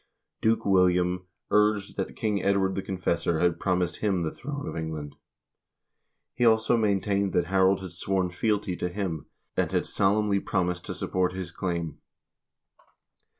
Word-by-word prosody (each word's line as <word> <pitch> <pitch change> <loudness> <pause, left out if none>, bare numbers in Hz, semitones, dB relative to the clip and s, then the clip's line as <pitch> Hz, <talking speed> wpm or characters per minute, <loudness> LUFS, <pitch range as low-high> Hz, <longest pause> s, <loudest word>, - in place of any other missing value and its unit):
Duke 110 +1 +2
William 90 -1 +3 0.2
urged 105 -1 +2
that 95 - -3
King 105 -3 0
Edward 100 -1 +2
the 95 - -2
Confessor 90 -3 -1
had 90 -1 +2
promised 90 -2 0
him 95 -5 0
the 80 - -1
throne 145 +2 -6
of - - -5
England. 80 -3 -5 1.2
He - - -1
also 110 0 +4
maintained 100 -3 +1
that 90 - +2
Harold 95 0 +3
had 95 -2 -7
sworn 90 +1 -1
fealty 105 0 0
to 90 - -2
him, 90 -5 -3 0.3
and - - 0
had - - +1
solemnly 100 0 +2
promised 90 -3 -1
to - - -4
support 90 -1 0
his 90 -2 -5
claim. 85 -2 -3
95 Hz, 150 wpm, -27 LUFS, 90-100 Hz, 1.2 s, also